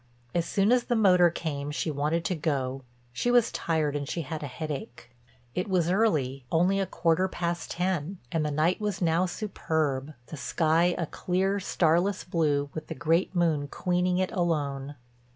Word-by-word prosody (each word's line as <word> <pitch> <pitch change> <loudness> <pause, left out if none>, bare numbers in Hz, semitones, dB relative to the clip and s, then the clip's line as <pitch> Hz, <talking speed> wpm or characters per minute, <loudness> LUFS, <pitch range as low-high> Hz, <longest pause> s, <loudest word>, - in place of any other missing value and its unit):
As 170 -1 0
soon 200 +3 +2
as 250 -1 +3
the 240 - 0
motor 180 -5 +5
came 145 -4 -4
she 155 +2 -2
wanted 150 +4 -1
to - - +1
go—she 130 - -3
was 245 -2 +4
tired, 150 -3 -1
she 170 - -2
had 155 +2 -5
a 145 - -4
headache. 135 -4 -6 0.4
It 180 - -2
was 175 -2 +2
early, 150 - +1
only 180 +4 +3
a 195 - 0
quarter 165 +3 +1
past 175 -2 -3
ten, 180 0 -1
and 160 -2 0
the 150 - 0
night 155 +7 +1
was 205 -2 -2
now 175 +1 +2
superb, 155 -8 -2
the 155 - -8
sky 165 +4 +2
a 170 - -1
clear, 190 +5 -1
starless 180 +1 +1
blue 145 -5 0
with 155 -1 -6
the - - -5
great 170 +3 +1
moon 160 -5 +1
queening 180 +3 0
it 185 0 0
alone. 145 -6 -1
165 Hz, 170 wpm, -28 LUFS, 145-180 Hz, 0.4 s, motor